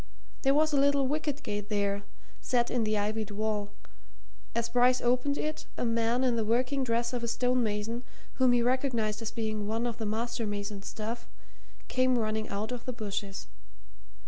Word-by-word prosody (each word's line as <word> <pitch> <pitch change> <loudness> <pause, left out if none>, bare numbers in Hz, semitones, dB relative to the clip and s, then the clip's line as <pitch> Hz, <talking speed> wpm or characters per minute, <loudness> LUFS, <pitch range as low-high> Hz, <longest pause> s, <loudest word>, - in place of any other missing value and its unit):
There 270 0 +4
was 310 +1 +3
a 280 - +4
little 280 0 +4
wicket 295 +1 -1
gate 205 0 -3
there, 200 -1 +1 0.4
set 240 -1 +1
in 240 -3 +1
the 215 0 +1
ivied 215 +1 -1
wall; 210 0 -1 0.9
as 235 0 +1
Bryce 250 +1 +4
opened 255 +4 +2
it, 310 0 -3
a - - 0
man 230 +2 +2
in 250 -2 +3
the 225 - +1
working 250 +5 +1
dress 235 0 0
of 245 -1 -2
a - - 0
stone 250 +2 +2
mason, 220 +2 -1 0.4
whom 255 -1 +6
he 240 -1 +4
recognized 235 -4 +1
as 225 - -2
being 215 -2 -2
one 225 +2 0
of 235 -1 -3
the 220 - -2
master 230 +1 -1
mason's 205 -1 -4
staff, 225 +2 -5 0.6
came 255 -1 +3
running 215 -1 -1
out 210 +4 -3
of 245 -1 -5
the 255 - -2
bushes. 205 -3 -4
230 Hz, 180 wpm, -30 LUFS, 215-250 Hz, 0.9 s, whom